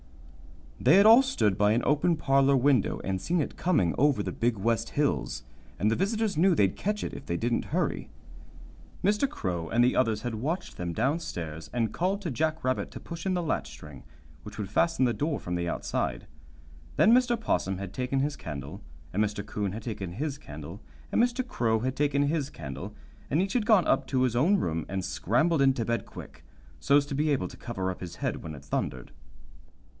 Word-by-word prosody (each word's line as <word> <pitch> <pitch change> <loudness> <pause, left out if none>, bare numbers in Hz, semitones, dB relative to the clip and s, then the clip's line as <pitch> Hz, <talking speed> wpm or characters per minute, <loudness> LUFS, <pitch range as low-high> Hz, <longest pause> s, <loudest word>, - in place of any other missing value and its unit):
They 135 +7 +5
had 200 +2 +7
all 225 +4 +9
stood 110 - 0
by 105 +1 +4
an 120 - +1
open 150 +4 +3
parlor 135 -2 +3
window 130 -4 +2
and 95 -1 -2
seen 175 - 0
it 145 - -2
coming 105 - +1
over 140 -6 +3
the - - -3
Big 115 -1 0
West 115 +3 0
Hills, 140 - -1 0.3
and 105 +2 +1
the - - +2
visitors 210 +2 0
knew 180 +2 +4
they'd 100 -8 +2
catch 210 +1 -2
it - - -4
if - - -9
they 85 - -1
didn't 120 +3 0
hurry. - - -2 0.9
Mr. 210 +8 +2
Crow 85 - -3
and 120 +1 +3
the 125 - +3
others 110 -4 +1
had 120 -2 -3
watched 155 - -3
them 90 -1 -3
down 135 - 0
stairs, 80 - -6
and 115 -2 -1
called 190 +3 0
to 170 - -2
Jack 155 +4 -1
Rabbit 130 0 0
to - - -9
push 170 +2 -7
in 185 - +1
the 175 - -1
latch 160 - -1
string, 75 -3 -11 0.4
which - - -10
would 105 -3 -5
fasten 165 -6 +2
the 120 - +1
door 150 +3 -1
from 90 - -5
the 85 -1 -1
outside. - - -2 0.7
Then 220 - +5
Mr. 245 -2 +3
'Possum 95 - -1
had 95 -1 -6
taken 130 +1 -1
his 145 +1 -1
candle, 75 - -7 0.3
and 105 +3 +2
Mr. 105 -1 -3
'Coon 105 -2 -3
had 110 +1 -6
taken 100 -7 -5
his 145 - -3
candle, 80 - -9 0.3
and - - +3
Mr. 245 +1 0
Crow 110 - 0
had 130 +2 -1
taken 140 0 +2
his 145 -1 0
candle, 70 - -7 0.3
and 150 - +1
each 195 +1 0
had 230 -4 0
gone 215 -7 +5
up - - +2
to 130 -2 +1
his 125 -2 +1
own 170 +12 +4
room 80 - -2
and 95 -2 -2
scrambled 140 - +1
into 135 -4 +3
bed 115 +1 -2
quick, - - -11 0.4
so's 140 - +4
to 145 - -6
be 150 +3 +1
able 140 -3 +1
to - - -11
cover 95 -6 -3
up 90 - -8
his 85 -1 -7
head - - -3
when 80 -2 -7
it 70 0 -12
thundered. 65 0 -3
125 Hz, 210 wpm, -28 LUFS, 95-160 Hz, 0.9 s, all